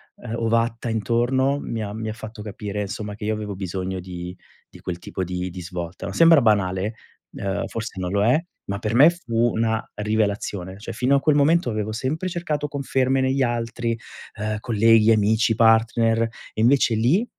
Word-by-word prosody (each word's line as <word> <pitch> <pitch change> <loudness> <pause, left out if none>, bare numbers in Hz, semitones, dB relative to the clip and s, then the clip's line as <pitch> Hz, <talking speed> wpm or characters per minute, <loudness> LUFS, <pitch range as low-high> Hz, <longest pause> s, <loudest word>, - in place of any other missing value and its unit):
uhm, 110 - -8
ovatta 115 +1 0
intorno, 120 +5 +1
mi 115 -1 -4
ha 105 0 -5
mi 110 0 -4
ha - - -3
fatto 110 0 -9
capire 105 -1 -5
insomma 105 +1 -5
che 105 - -10
io 110 - +1
avevo 105 -2 -5
bisogno 95 0 -4
di 90 0 -7 0.3
di - - -15
quel 90 -1 -5
tipo 95 - -4
di 90 0 -3
di 90 +1 -7
svolta. 90 0 -6
Sembra 165 -3 +6
banale, 100 -1 +1 0.4
uhm, 100 0 -2
forse 110 -3 -6
non 90 -1 -3
lo 100 0 +2
è, 125 +6 +5 0.3
ma 100 - -3
per 110 +1 -2
me 145 +7 +8
fu 120 -8 0
una 110 0 0 0.2
rivelazione. 100 -3 -1
Cioè 105 - -7
fino 130 +3 +2
a - - +4
quel 155 -2 +3
momento 160 +1 +3
avevo 110 0 -2
sempre 145 +10 -2
cercato 155 -4 -2
conferme 135 -1 0
negli 130 +1 +1
altri, 115 -1 -2 0.4
uhm, 110 0 -2
colleghi, 115 -1 +4
amici, 110 +1 +3
partner 115 0 +3
e 115 -1 -6
invece 120 -1 +4
lì, 135 - +2
110 Hz, 180 wpm, -23 LUFS, 100-120 Hz, 0.4 s, me